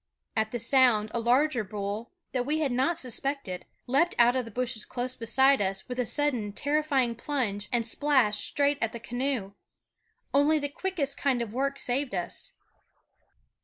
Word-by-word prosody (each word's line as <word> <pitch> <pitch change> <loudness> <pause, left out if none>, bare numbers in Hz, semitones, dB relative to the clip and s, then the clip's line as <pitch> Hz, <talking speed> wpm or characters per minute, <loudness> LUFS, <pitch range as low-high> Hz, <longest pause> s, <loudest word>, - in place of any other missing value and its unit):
At 220 0 +1
the 240 - -2
sound 230 -3 +4
a 235 - 0
larger 245 +1 +2
bull, 205 +3 -5 0.2
that 250 -2 0
we 295 +4 0
had 300 -4 0
not 265 +8 +1
suspected, 255 - -3 0.2
leaped 285 +8 +2
out 240 +1 +5
of 255 -2 0
the - - -8
bushes 235 -1 -1
close 250 +1 -4
beside 265 +3 +3
us 195 -1 -2
with 250 0 -5
a 245 - +1
sudden 250 -9 +1
terrifying 285 -3 +1
plunge 230 -6 -2
and 235 -2 0
splashed 260 -4 +2
straight 285 0 +2
at 225 -1 -1
the 235 - -6
canoe. 245 -4 -3 0.8
Only 290 +3 +4
the 285 -1 -2
quickest 290 -4 -3
kind 265 -3 +1
of 230 -3 -4
work 275 +2 -1
saved 255 -2 -1
us. 175 -1 -3
250 Hz, 165 wpm, -28 LUFS, 225-280 Hz, 0.8 s, out